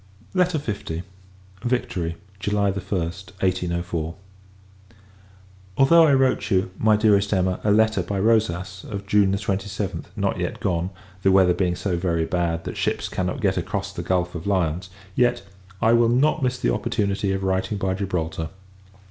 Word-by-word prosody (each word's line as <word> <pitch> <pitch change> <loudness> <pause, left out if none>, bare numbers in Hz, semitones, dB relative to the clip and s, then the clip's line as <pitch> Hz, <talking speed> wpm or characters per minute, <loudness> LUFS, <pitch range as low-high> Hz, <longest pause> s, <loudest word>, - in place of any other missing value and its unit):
LETTER 180 -3 +2
L. 95 -6 -3 0.6
Victory, 115 -9 -1 0.2
July 100 0 +1
1st, 95 -2 -4
1804. 85 -3 -1 1.6
Although 160 +4 +7
I - - +4
have 135 -1 +4
wrote 130 -1 +1
you, 95 -2 +1
my 110 -1 +4
dearest 105 -2 +3
Emma, 95 -2 +1
a 105 - +1
letter, 110 -1 +3
by 95 +3 -3
Rosas, 95 -4 +1
of 100 -1 -5
June 100 -1 +3
27th, 100 0 -2
not - - -1
yet - - -3
gone, 85 0 0 0.3
the 95 - +4
weather 95 -2 +5
being 90 -1 0
so 90 0 -1
very 85 -2 0
bad, 85 -1 -1
that - - -6
ships - - -1
cannot 90 -1 -2
get - - +1
across - - -3
the - - -4
Gulph 90 -1 0
of 85 +2 -6
Lyons, 90 -2 0 0.2
yet 120 +1 +2 0.4
I 115 - +5
will 115 0 +5
[not] 145 +6 +3
miss 125 -1 0
the - - +1
opportunity 100 -4 0
of 95 0 -2
writing 95 +2 0
by 95 -1 0
Gibraltar. 85 -4 -2
95 Hz, 155 wpm, -23 LUFS, 90-110 Hz, 1.6 s, Although